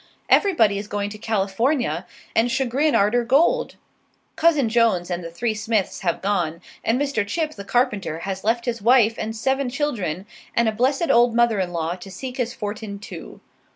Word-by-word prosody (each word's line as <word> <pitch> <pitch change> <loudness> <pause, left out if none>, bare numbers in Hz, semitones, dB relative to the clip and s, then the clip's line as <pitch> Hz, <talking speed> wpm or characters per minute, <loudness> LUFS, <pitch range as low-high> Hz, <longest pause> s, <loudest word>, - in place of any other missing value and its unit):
Everybody 225 - +4
is 205 - -7
going 205 0 -3
to 215 - -9
California 215 - 0 0.3
and 230 +2 +3
Chagrin 265 +4 +1
arter 215 +5 +3
gold. 335 - +2 0.6
Cousin 310 -6 +3
Jones 220 -6 +2
and 175 0 -2
the 165 - -6
three 220 +7 -2
Smiths 215 -2 -1
have 175 -3 -2
gone; 180 -5 0 0.2
and 230 +3 +1
Mr. 280 -7 0
Chip, 310 +8 -2
the 200 - -8
carpenter, 205 - 0
has 190 +1 -4
left 230 +2 +1
his 235 -3 -2
wife 230 0 +5
and 220 +1 -3
seven 265 +3 0
children 215 - -2 0.3
and 235 -1 +3
a - - +3
blessed 270 +8 +1
old 235 0 +4
mother 235 -3 +3
in 180 -2 -1
law, 165 -1 -2
to 195 - -11
seek 250 +7 -7
his 245 -2 -1
fortin, 210 -2 -5
too. 200 - -10
225 Hz, 180 wpm, -22 LUFS, 200-255 Hz, 0.6 s, wife